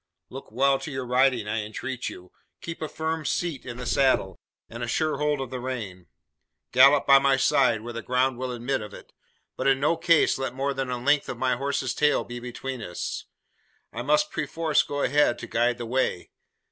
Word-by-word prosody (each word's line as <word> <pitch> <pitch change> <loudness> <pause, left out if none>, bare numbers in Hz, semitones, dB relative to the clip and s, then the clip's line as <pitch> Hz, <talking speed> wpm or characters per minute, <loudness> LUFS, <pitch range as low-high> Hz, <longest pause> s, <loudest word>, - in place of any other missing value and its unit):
Look 135 -2 -10
well 135 +3 +2
to - - -6
your 130 -2 -4
riding, 125 -2 +2
I 105 +1 -1
entreat 120 +4 -5
you! 90 0 -12 0.3
Keep 165 -1 -7
a 155 - -3
firm 160 0 -3
seat 155 -2 -2
in 120 -1 -6
the 125 - -6
saddle, 125 -7 +1 0.3
and 120 +1 -9
a 120 - -2
sure 155 +4 0
hold 150 -1 +1
of 130 -2 -5
the 130 - -4
rein. 110 -8 -6 0.6
Gallop 135 +3 +6
by 135 0 +7
my 135 -1 +3
side, 125 -4 +3
where 120 +1 -7
the 115 - -5
ground 125 +1 0
will 130 0 -3
admit 125 +2 -2
of 105 - -8
it; - - -14 0.4
but - - -2
in 135 -1 +4
no 150 +4 +2
case 165 -4 +3
let 130 -2 -3
more 140 +1 -1
than 135 -1 -3
the 125 -1 -2
length 145 +4 +1
of - - -4
my 130 -1 +1
horse's 135 -1 -2
tail 150 +3 +2
be 120 0 -7
between 125 +1 -6
us. 90 -5 -5 0.7
I 115 - -4
must 150 +3 +2
perforce 160 0 +1
go 145 0 -3
ahead 145 -2 +3
to - - -7
guide 120 +1 +1
the 120 - -5
way. 120 -7 -1
130 Hz, 210 wpm, -26 LUFS, 120-140 Hz, 0.7 s, by